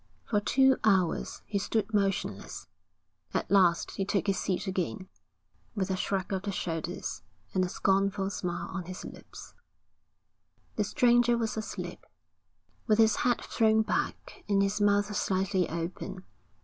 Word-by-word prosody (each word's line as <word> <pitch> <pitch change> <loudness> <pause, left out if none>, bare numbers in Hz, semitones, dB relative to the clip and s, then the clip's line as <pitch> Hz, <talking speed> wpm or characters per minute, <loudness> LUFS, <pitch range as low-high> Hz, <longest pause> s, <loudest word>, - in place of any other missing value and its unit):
For 210 - +1
two 265 +5 +4
hours 190 -6 +1
he 200 - -1
stood 220 +1 -1
motionless. 200 -2 -1 0.7
At - - -1
last 180 -4 +4
he 195 - -2
took 200 0 0
his 195 -2 +1
seat 185 +1 -1
again, 190 0 -3 0.7
with 195 -2 -1
a - - +1
shrug 190 0 -2
of 190 - -1
the 200 +1 -3
shoulders, 170 -1 -4 0.3
and 185 - +2
a 180 - -1
scornful 195 +1 +1
smile 175 -3 -3
on 185 -3 -5
his 185 +1 -7
lips. - - -11 1.2
The - - +1
stranger 240 -3 +4
was 225 -2 -1
asleep, 220 0 -5 0.8
with 215 -2 +4
his 220 -2 +5
head 245 -1 +1
thrown 220 -1 +3
back - - -3
and 200 -1 +4
his 200 +1 0
mouth 205 0 +2
slightly 190 -2 +1
open. 180 +3 -5
195 Hz, 145 wpm, -29 LUFS, 185-215 Hz, 1.2 s, his